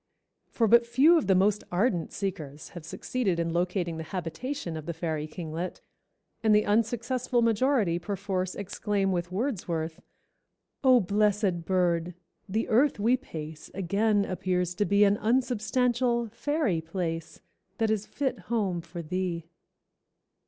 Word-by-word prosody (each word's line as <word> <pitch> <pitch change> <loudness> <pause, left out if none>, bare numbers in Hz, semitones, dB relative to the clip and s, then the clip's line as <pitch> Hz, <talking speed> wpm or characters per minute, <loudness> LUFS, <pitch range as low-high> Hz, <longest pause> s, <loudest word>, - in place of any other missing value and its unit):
For 230 - +1
but 235 +2 +6
few 270 +8 +5
of 325 - +2
the 190 - +5
most 200 +2 +3
ardent 180 -3 +1
seekers 160 -8 -5
have 175 - -9
succeeded 190 +4 -2
in 165 0 -1
locating 175 -1 -1
the 160 - -5
habitation 185 - -4
of 155 0 -7
the 170 - -3
fairy 160 -2 -2
kinglet, 165 +2 -5 0.6
and 220 -2 +4
the 210 - +4
unsuccessful 240 +3 +1
majority 230 -6 +2
perforce 190 -1 -3
exclaim 200 0 -1
with 175 -1 -2
Wordsworth, 175 - -2 0.8
"Oh, 255 -2 +6
blessed 200 -3 +1
bird! 175 -2 +1 0.3
The 220 +4 0
earth 255 +2 +3
we 230 +5 +4
pace 155 - -8
Again 200 +2 +1
appears 180 -1 -1
to 205 +3 0
be 200 +1 +4
An 200 0 +4
unsubstantial, 240 0 +1
fairy 250 - 0
place, 165 -1 -4 0.4
That 225 -1 +1
is 215 -1 -1
fit 270 -6 -2
home 200 -7 0
for 170 +1 -8
thee!" 175 0 -2
195 Hz, 140 wpm, -28 LUFS, 170-230 Hz, 0.8 s, but